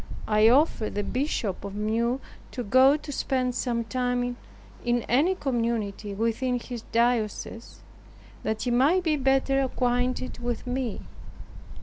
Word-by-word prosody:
I 215 +1 +5
offered 250 -5 +2
the 205 - 0
Bishop 245 - -2
of 200 0 -6
Meaux 230 +4 0 0.3
to 245 - -3
go 260 +6 +5
to 300 -1 -8
spend 255 -2 0
some 240 -2 -1
time 245 +1 -1 0.5
in 240 -1 +1
any 305 +10 +2
community 230 - -2
within 230 +4 0
his 240 -1 -7
diocese, 230 -1 -1 0.6
that 220 0 -2
he 245 - 0
might 290 +10 +3
be 320 -3 +2
better 270 0 +2
acquainted 250 -1 -1
with 240 0 -3
me. 250 -3 -3
245 Hz, 130 wpm, -26 LUFS, 230-260 Hz, 0.6 s, I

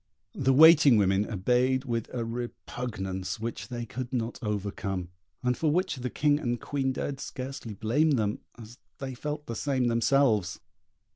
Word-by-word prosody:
The 135 -1 +1
waiting 150 -3 +8
women 100 0 +2
obeyed 125 +6 +1
with 115 -3 -3
a 120 -2 -3
repugnance 115 -5 -5
which 115 +1 -5
they 120 -2 -5
could 125 +2 -6
not 120 -2 -2
overcome, 100 -4 -3 0.3
and 125 0 +2
for 155 - 0
which 180 -1 0
the 125 0 -3
King 145 +2 +2
and 120 -4 -2
Queen 135 0 -1
dared 135 +1 -4
scarcely 130 -4 -6
blame 140 +10 +2
them, 110 -4 0 0.2
as 115 +1 -12 0.2
they 135 -1 -5
felt 150 +3 -5
the 115 - -5
same 130 -1 0
themselves. 115 -5 +2
125 Hz, 155 wpm, -28 LUFS, 110-135 Hz, 0.3 s, waiting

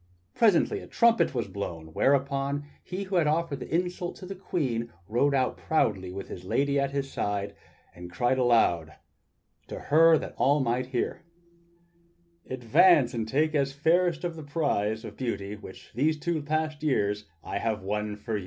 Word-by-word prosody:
Presently 210 -7 +3
a - - -11
trumpet 230 - +3
was 120 - -1
blown, 80 -5 -6
whereupon 140 - +1 0.2
he 185 +2 -5
who 190 -1 -1
had 165 -3 +3
offered 155 -2 0
the - - -8
insult 175 +1 -1
to 185 - -10
the 195 - -6
Queen 130 -11 -2 0.2
rode 140 +6 +2
out 130 -2 +1
proudly 100 -12 0
with 95 +1 -6
his 90 - -8
lady 140 +8 +1
at 140 0 +1
his 140 -1 -3
side, 100 0 -2 0.4
and 90 0 -10
cried 120 +6 +1
aloud 115 -10 +2 0.7
to - - -6
her 160 +2 +5
that - - -6
all 145 +2 +3
might 125 -1 0
hear: 130 +4 -2 1.3
"Advance, 130 +3 +4
and 115 -2 -2
take 155 +6 +1
as 140 -2 +1
fairest 165 +3 +2
of 170 -2 -3
the 160 - -8
fair - - -11
the - - -20
prize 110 -9 0
of 105 -2 -9
beauty 105 -5 -3
which 100 -2 -12
for - - -22
these 155 +4 +2
two 160 0 -2 0.4
years 105 -9 +1
past 95 - -28
I 100 - -3
have 110 -3 -2
won 105 +1 -2
for 105 +1 -3
you!" - - -3
135 Hz, 180 wpm, -27 LUFS, 105-155 Hz, 1.3 s, her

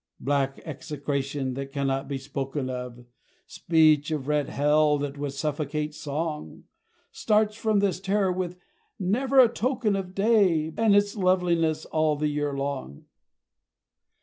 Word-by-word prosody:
Black 135 0 0
execration 140 -3 -3
that 135 +1 -6
cannot 135 -1 -1
be 140 - -3
spoken 135 0 -4
of 125 -1 -7 0.4
Speech 155 -2 +3
of 150 -4 -3
red 150 -2 0
hell 150 +1 +3
that 140 -1 -4
would 145 -1 -3
suffocate 150 +1 -3
Song, 150 - -5 0.5
Starts 215 -1 +1
from 220 -2 +1
this 195 -3 0
terror 195 0 +1
with 180 -1 -3 0.4
never 250 +8 +2
a 250 - +9
token 235 -2 0
of 190 -1 -5
Day 195 -7 +3
and 225 -3 +3
its 205 +1 +2
loveliness 180 -5 +1
all 155 -1 +1
the 150 +1 -1
year 145 -1 -2
long. 135 - -5
155 Hz, 135 wpm, -26 LUFS, 140-190 Hz, 0.5 s, a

